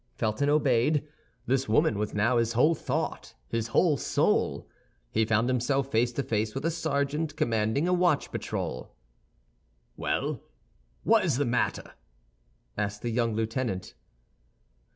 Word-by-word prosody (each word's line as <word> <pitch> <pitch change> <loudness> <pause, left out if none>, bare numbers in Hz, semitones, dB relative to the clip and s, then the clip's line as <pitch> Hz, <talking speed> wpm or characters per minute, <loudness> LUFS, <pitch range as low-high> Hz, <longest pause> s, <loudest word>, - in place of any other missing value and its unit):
Felton 110 +7 0
obeyed; 145 0 +2 0.4
this 130 -1 0
woman 110 0 +3
was 105 0 -2
now 115 +4 +2
his 115 0 0
whole 150 +8 +4
thought, - - -3
his 115 -1 -1
whole 150 +6 +3
soul. - - 0 0.4
He 110 0 +2
found 110 +1 +2
himself 130 +2 0
face 120 +2 +2
to 140 - -1
face 110 -2 -1
with 135 - -3
a 165 - +2
sergeant 150 -1 -1
commanding 115 +4 +1
a 180 - +2
watch 175 -4 +2
patrol. 65 - -4 1.0
"Well, - - -2 0.6
what 225 -1 +4
is 155 -9 +1
the 145 - +1
matter?" 120 0 -1 0.8
asked 105 0 -3
the 120 - -1
young 115 -1 0
lieutenant. 110 -3 -2
125 Hz, 135 wpm, -28 LUFS, 110-145 Hz, 1.0 s, whole